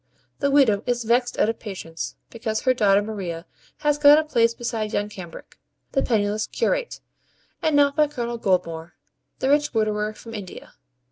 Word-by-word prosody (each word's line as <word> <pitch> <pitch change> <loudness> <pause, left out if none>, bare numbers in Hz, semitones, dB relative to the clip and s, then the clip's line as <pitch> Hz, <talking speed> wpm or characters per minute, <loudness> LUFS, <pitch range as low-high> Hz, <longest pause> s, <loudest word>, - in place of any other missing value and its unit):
The 280 - +1
widow 265 -8 +4
is 240 -1 0
vexed 245 +2 +1
out - - +3
of 225 - -2
patience, 170 -6 -6 0.2
because 225 -2 -3
her 255 - +3
daughter 205 -4 +3
Maria 185 -6 -5 0.4
has 295 -1 +1
got 295 0 +8
a 315 - +3
place 230 -6 +2
beside 225 -2 -3
young 205 0 -1
Cambric, 180 -5 -11 0.3
the 270 - +1
penniless 215 -3 0
curate, - - -1 0.6
and 315 -2 +1
not 285 -1 +4
by 305 -1 +4
Colonel 240 -4 -4
Goldmore, 170 -5 -1 0.4
the 265 - -1
rich 295 -3 +2
widower 215 -1 0
from 225 +1 -11
India. 200 -5 -9
225 Hz, 165 wpm, -23 LUFS, 205-270 Hz, 0.6 s, got